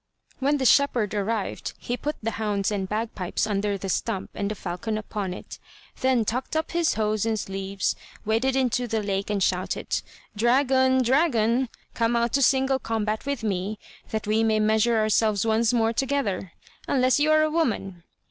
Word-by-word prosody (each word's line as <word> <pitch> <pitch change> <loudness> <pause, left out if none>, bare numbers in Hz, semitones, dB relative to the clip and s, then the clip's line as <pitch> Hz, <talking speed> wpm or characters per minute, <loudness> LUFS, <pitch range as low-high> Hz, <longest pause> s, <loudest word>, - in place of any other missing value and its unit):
When 285 +2 +2
the 265 - -1
shepherd 245 -6 +3
arrived, 210 0 -2
he 245 - -3
put 295 +4 -3
the 225 - -1
hounds 210 -3 -1
and 195 -2 -2
bagpipes 210 -4 -2
under 205 -1 -1
the 195 - -6
stump 195 +1 -2
and 200 - -2
the 215 - -3
falcon 210 +4 -4
upon 210 -3 -4
it, 180 - -9 0.4
then 255 -3 +2
tucked 255 +7 -2
up 315 - -1
his 340 -2 +1
hose 215 -1 0
and 225 -1 0
sleeves 195 0 -2 0.3
waded 230 +5 +1
into 250 -2 +1
the 220 -2 -1
lake 200 0 -2
and 200 -2 +1
shouted: 180 0 -1 0.3
"Dragon, 260 +3 +3
dragon! 250 -3 +2 0.2
come 230 0 +1
out 235 0 +1
to 275 - +3
single 265 0 +3
combat 220 0 -2
with 280 -5 -2
me, 200 0 -2 0.3
that 220 -1 -3
we 215 +2 +2
may 220 -1 +2
measure 220 +2 +3
ourselves 215 -1 +2
once 225 0 +2
more 230 -2 +2
together, 230 - -1 0.3
unless 255 0 +3
you 300 +1 +3
are 310 0 +5
a 310 - +1
woman!" 215 - -1
225 Hz, 175 wpm, -25 LUFS, 205-260 Hz, 0.4 s, are